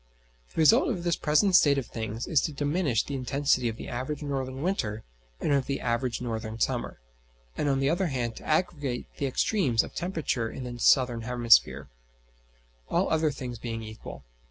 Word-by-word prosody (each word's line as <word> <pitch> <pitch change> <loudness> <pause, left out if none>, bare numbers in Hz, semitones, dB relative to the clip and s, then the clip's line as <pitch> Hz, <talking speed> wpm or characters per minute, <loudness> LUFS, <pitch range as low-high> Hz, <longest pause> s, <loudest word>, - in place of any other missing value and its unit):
The - - -20
result 225 - +5
of 185 -8 -2
this 170 -2 +1
present 165 +6 +3
state 145 -6 +6
of 135 - -1
things 110 0 -5
is 155 -5 +2
to 155 - -2
diminish 145 -3 0
the 140 - -7
intensity 135 -1 +1
of 110 - -5
the - - -8
average 130 +5 -4
northern 135 -1 -3
winter 110 - -2 0.4
and - - -1
of 140 -2 +1
the 140 -1 -2
average 120 +1 -1
northern 110 -2 -4
summer, - - -1 0.6
and 145 - 0
on 135 -1 +1
the 135 +1 +2
other 180 +2 +1
hand 120 -5 -2
to - - -10
aggravate 150 -6 -1
the 140 - -1
extremes 130 - +1
of - - -10
temperature 160 -10 -2
in 130 - -7
the 120 -1 -7
southern 125 -2 +4
hemisphere; 120 0 +3 1.0
all - - +1
other 160 -1 +2
things 125 -4 -6
being 115 -1 -5
equal. 110 0 -9
135 Hz, 180 wpm, -27 LUFS, 120-150 Hz, 1.0 s, state